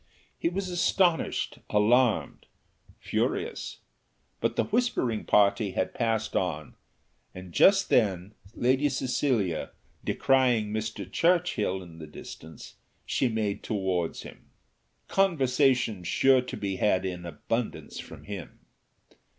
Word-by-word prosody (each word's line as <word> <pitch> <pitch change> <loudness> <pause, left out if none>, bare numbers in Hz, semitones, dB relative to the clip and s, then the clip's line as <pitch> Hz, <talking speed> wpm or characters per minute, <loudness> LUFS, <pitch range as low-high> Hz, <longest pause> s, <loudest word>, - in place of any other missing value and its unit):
He - - -1
was 190 +2 -3
astonished, 175 -1 +1
alarmed, 115 +3 +2 0.5
furious; - - -2 0.6
but - - -1
the - - +2
whispering 215 - 0
party 100 -1 +3
had 95 - -1
passed 115 -2 -1
on, 80 -5 -2 0.6
and 90 -2 -10
just 195 0 +5
then 100 -3 +1 0.2
Lady 130 +4 +2
Cecilia 125 - 0 0.3
descrying 125 -6 +2
Mr. 110 0 -3
Churchill 165 - +1
in 85 -2 -13
the 80 - -8
distance, 80 +1 -11 0.3
she 130 - +1
made 110 -3 -2
towards 95 -5 -2
him. - - -13 0.6
Conversation 135 - +2
sure 130 +8 +4
to 125 - -7
be 100 -2 -3
had 95 -3 +2
in 90 -2 -4
abundance 105 +8 -4
from - - -10
him. 100 -4 -8
110 Hz, 110 wpm, -28 LUFS, 95-135 Hz, 0.6 s, just